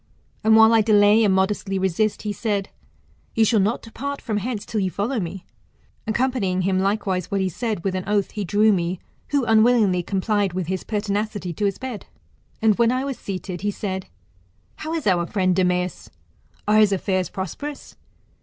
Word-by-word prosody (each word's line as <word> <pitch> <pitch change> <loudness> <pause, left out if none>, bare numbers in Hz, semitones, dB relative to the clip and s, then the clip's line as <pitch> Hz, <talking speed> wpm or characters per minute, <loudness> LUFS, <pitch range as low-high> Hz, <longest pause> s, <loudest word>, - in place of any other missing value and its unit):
And 220 +1 +5
while 220 +1 +7
I 225 - +5
delay 210 0 +5
and 205 - +3
modestly 195 +1 0
resist, 190 +3 0
he 210 -1 -2
said, 205 -3 -2 0.7
You 225 - +4
shall 220 0 +3
not 210 +5 0
depart 280 +5 -5
from 220 -4 -3
hence 210 0 -3
till 220 - -2
you 190 - 0
follow 220 +7 -2
me. 180 0 -5 0.6
Accompanying 195 -6 0
likewise 195 -2 -1
what 200 - 0
he 190 -1 0
said 215 0 -3
with 195 - -1
an 185 -1 -3
oath, 205 -1 +1
he 210 - -4
drew 210 +3 +3
me, 175 -1 -1 0.3
who 285 -3 +1
unwillingly 220 -4 +4
complied 200 +1 0
with 185 -1 -2
his 185 +2 -3
pertinacity, 205 -3 -2
to 205 - -2
his 200 - 0
bed. 255 -5 -7 0.6
And 220 -1 +3
when 235 0 +4
I 255 +2 -1
was 275 -2 -4
seated, 185 -2 -5
he 205 - 0
said, 190 -2 -4 0.7
How 315 - -5
is 325 - -3
our 175 -4 +2
friend 185 -2 +1
Demeas? 180 -1 0 0.6
Are 215 +1 +5
his 210 -2 +5
affairs 185 -1 0
prosperous 275 - -6
205 Hz, 180 wpm, -23 LUFS, 190-220 Hz, 0.7 s, while